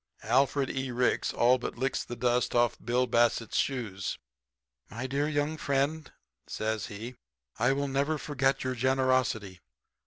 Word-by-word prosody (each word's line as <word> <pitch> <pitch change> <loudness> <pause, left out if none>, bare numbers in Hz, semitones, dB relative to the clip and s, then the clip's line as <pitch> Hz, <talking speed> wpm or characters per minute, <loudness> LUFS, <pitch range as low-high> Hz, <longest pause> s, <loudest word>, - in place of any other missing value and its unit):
"Alfred 135 0 +2
E. 135 0 -3
Ricks 125 0 +1
all 125 +2 +4
but 120 - -5
licks 135 +2 -1
the 120 - -7
dust 120 +1 +1
off 120 -1 +4
of - - -21
Bill 125 +1 +2
Bassett's 115 -1 +1
shoes. 105 -8 -2 0.7
"'My 120 +5 -5
dear 140 +3 0
young 150 +1 -1
friend,' 140 +2 -1 0.4
says 110 0 -2
he, 115 +5 -8 0.4
'I 120 +4 +3
will 140 +1 -1
never 140 +3 0
forget 135 -2 0
your 130 0 -1
generosity. 130 -6 +1
130 Hz, 150 wpm, -29 LUFS, 120-135 Hz, 0.7 s, all